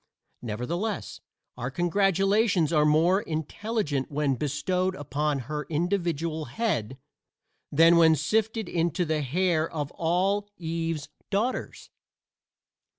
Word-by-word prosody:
Nevertheless 165 Hz, -, -3 dB, 0.4 s
our 125 Hz, +1 st, -3 dB
congratulations 195 Hz, -, +2 dB
are 150 Hz, -1 st, +4 dB
more 170 Hz, +6 st, +4 dB
intelligent 160 Hz, -, -2 dB
when 145 Hz, -1 st, +1 dB
bestowed 180 Hz, +7 st, -1 dB
upon 145 Hz, -1 st, -1 dB
her 150 Hz, +5 st, -4 dB
individual 165 Hz, -2 st, -1 dB
head 135 Hz, -, -2 dB, 0.7 s
than 165 Hz, +3 st, +6 dB
when 160 Hz, -1 st, +6 dB
sifted 220 Hz, -, 0 dB
into 170 Hz, +1 st, 0 dB
the 155 Hz, -1 st, 0 dB
hair 160 Hz, +3 st, +1 dB
of 145 Hz, -3 st, -4 dB
all 190 Hz, +5 st, 0 dB
Eve's 165 Hz, -3 st, -3 dB, 0.2 s
daughters. 220 Hz, +6 st, -2 dB
165 Hz, 100 wpm, -27 LUFS, 150-190 Hz, 0.7 s, than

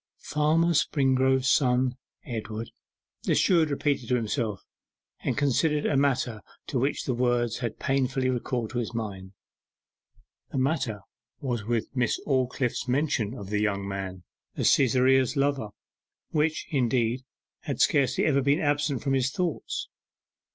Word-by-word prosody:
'Farmer 160 Hz, +3 st, +2 dB
Springrove's 130 Hz, -3 st, +2 dB
son, 130 Hz, -2 st, +3 dB, 0.3 s
Edward,' 110 Hz, -3 st, -5 dB, 0.5 s
the -, -, +1 dB
steward 165 Hz, -4 st, +4 dB
repeated 140 Hz, -4 st, -1 dB
to 125 Hz, -, +3 dB
himself, 110 Hz, -3 st, -2 dB, 0.6 s
and -, -, -2 dB
considered 150 Hz, +2 st, +2 dB
a -, -, +1 dB
matter 130 Hz, -5 st, +1 dB, 0.2 s
to 135 Hz, -, -2 dB
which 135 Hz, +4 st, 0 dB
the 130 Hz, -, -1 dB
words 120 Hz, -1 st, +1 dB
had 120 Hz, -3 st, -3 dB
painfully 135 Hz, -1 st, 0 dB
recalled 125 Hz, -2 st, -2 dB
his 120 Hz, -1 st, -3 dB
mind. 100 Hz, -4 st, -5 dB, 1.2 s
The -, -, -3 dB
matter 130 Hz, -6 st, 0 dB, 0.4 s
was 120 Hz, -6 st, -3 dB, 0.3 s
Miss 125 Hz, -4 st, 0 dB
Aldclyffe's 130 Hz, -2 st, 0 dB
mention 130 Hz, -4 st, 0 dB
of 100 Hz, -5 st, -8 dB
the 105 Hz, 0 st, +1 dB
young 100 Hz, -2 st, -1 dB
man 95 Hz, -2 st, -5 dB, 0.3 s
as -, -, +3 dB
Cytherea's 130 Hz, 0 st, +3 dB
lover, 140 Hz, -4 st, +1 dB, 0.6 s
which, 155 Hz, 0 st, 0 dB
indeed, 125 Hz, -3 st, +1 dB, 0.4 s
had -, -, -3 dB
scarcely 140 Hz, -3 st, +3 dB
ever 140 Hz, -3 st, +3 dB
been 140 Hz, +2 st, +2 dB
absent 145 Hz, -2 st, 0 dB
from 135 Hz, -, 0 dB
his 130 Hz, -1 st, +2 dB
thoughts. 170 Hz, +2 st, -3 dB
130 Hz, 130 wpm, -27 LUFS, 115-140 Hz, 1.2 s, steward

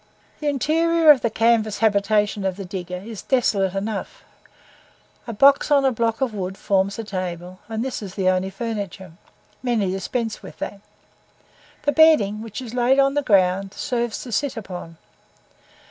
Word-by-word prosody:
The 300 Hz, -, -3 dB
interior 320 Hz, +3 st, +4 dB
of 275 Hz, -4 st, +4 dB
the 235 Hz, -, +1 dB
canvas 220 Hz, -2 st, +2 dB
habitation 210 Hz, -1 st, +1 dB
of 190 Hz, -1 st, -1 dB
the 195 Hz, 0 st, -7 dB
digger 180 Hz, -1 st, -6 dB
is 220 Hz, -4 st, -7 dB
desolate 200 Hz, -7 st, +1 dB
enough; 200 Hz, +1 st, -4 dB, 1.0 s
a -, -, -3 dB
box 275 Hz, +8 st, +4 dB
on 280 Hz, -2 st, +4 dB
a 265 Hz, -, +4 dB
block 230 Hz, +1 st, -1 dB
of 255 Hz, -4 st, 0 dB
wood 190 Hz, -1 st, -4 dB
forms 195 Hz, 0 st, 0 dB
a 225 Hz, -, -4 dB
table, 185 Hz, -2 st, -5 dB
and 225 Hz, +2 st, -3 dB
this 265 Hz, -, -4 dB
is 190 Hz, -3 st, -8 dB
the 190 Hz, -2 st, 0 dB
only 185 Hz, +1 st, +1 dB
furniture; 200 Hz, -4 st, -5 dB, 0.5 s
many 230 Hz, -7 st, 0 dB
dispense 220 Hz, +4 st, -3 dB
with -, -, -11 dB
that. 200 Hz, -, -6 dB, 1.0 s
The 290 Hz, -, +2 dB
bedding, 290 Hz, -11 st, +4 dB
which 225 Hz, +3 st, -7 dB
is 235 Hz, -2 st, -8 dB
laid 250 Hz, +2 st, +3 dB
on 275 Hz, 0 st, +4 dB
the 290 Hz, -, +1 dB
ground, 195 Hz, -4 st, +2 dB
serves 240 Hz, -3 st, -2 dB
to 245 Hz, -, -9 dB
sit 265 Hz, +3 st, -1 dB
upon. 180 Hz, -5 st, -8 dB
215 Hz, 165 wpm, -22 LUFS, 195-250 Hz, 1.0 s, interior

